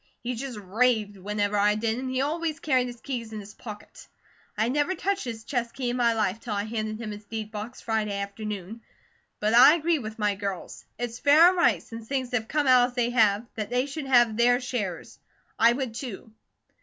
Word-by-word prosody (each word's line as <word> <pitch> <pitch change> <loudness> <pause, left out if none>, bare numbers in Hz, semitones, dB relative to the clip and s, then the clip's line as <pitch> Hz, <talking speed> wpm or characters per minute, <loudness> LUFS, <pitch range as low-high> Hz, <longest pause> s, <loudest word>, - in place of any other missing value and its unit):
He 245 +1 -2
just 250 -1 -5
raved 210 +1 +1
whenever 205 +1 -2
I 205 +1 +3
did, 225 +2 -1
an' 260 0 -4
he 260 0 0
always 315 +2 -2
carried 255 -4 +1
his 240 -1 -9
keys 235 -5 -5
in 215 - -5
his 205 +1 -11
pocket. 210 -3 -11 0.5
I 220 +2 +2
never 290 +8 0
touched 395 -4 -1
his 225 -2 -6
chest 235 -1 -3
key 250 -3 -2
in - - -3
my 235 -2 +3
life, 215 -2 0
till 225 -3 -4
I 200 - -1
handed 215 0 -4
him 220 -2 -5
his 210 0 -8
deed 220 0 -6
box 220 +3 -7
Friday 215 -3 -1
afternoon. 205 +1 -6 0.6
But 210 +1 +1
I 255 +6 +9
agree 335 -1 +1
with 220 -3 -7
my 210 -2 +1
girls. 200 -2 -6
It's 240 0 -4
fair 310 +5 +7
and 370 - -2
right, 345 - +3
since 225 -1 -10
things 260 -2 -2
have 225 -3 -1
come 300 +3 0
out 250 -1 +5
as 245 - -17
they 240 -1 +1
have, 220 -2 +3
that 215 -2 -4
they 250 +2 +1
should 285 0 -6
have 240 -4 +4
their 245 +1 +4
shares. 220 -9 -4 0.4
I 230 +1 +6
would, 250 -2 -3
too. 225 -3 -7
230 Hz, 215 wpm, -26 LUFS, 210-255 Hz, 0.6 s, I